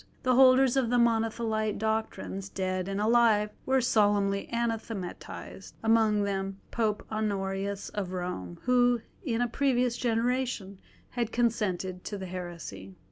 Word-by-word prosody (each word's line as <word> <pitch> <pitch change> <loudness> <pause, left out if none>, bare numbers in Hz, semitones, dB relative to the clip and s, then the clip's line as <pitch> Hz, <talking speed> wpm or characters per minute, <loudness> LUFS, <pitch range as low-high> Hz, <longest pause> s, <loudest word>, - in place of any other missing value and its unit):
The 255 - +3
holders 260 0 +6
of 265 -3 +2
Monothelite 225 -2 +1
doctrines, 215 -3 -2
dead 185 -1 -2
and 195 0 -2
alive, 215 -1 +4 0.2
were 265 0 +3
solemnly 205 -4 +2
anathematised, 225 -5 -4
among 220 -2 +3
them 195 -1 -2
Pope 215 -2 -1
Honorius 200 -2 -2
of 195 -3 -4
Rome, 175 - -4
who 245 -1 +3 0.2
in 240 -7 -1
a 245 - +2
previous 250 -1 +1
generation 235 -4 -1 0.3
had 235 -2 -2
consented 190 -6 -1
to 205 - -4
the 190 - -6
heresy. 170 - -7
215 Hz, 125 wpm, -29 LUFS, 195-235 Hz, 0.3 s, holders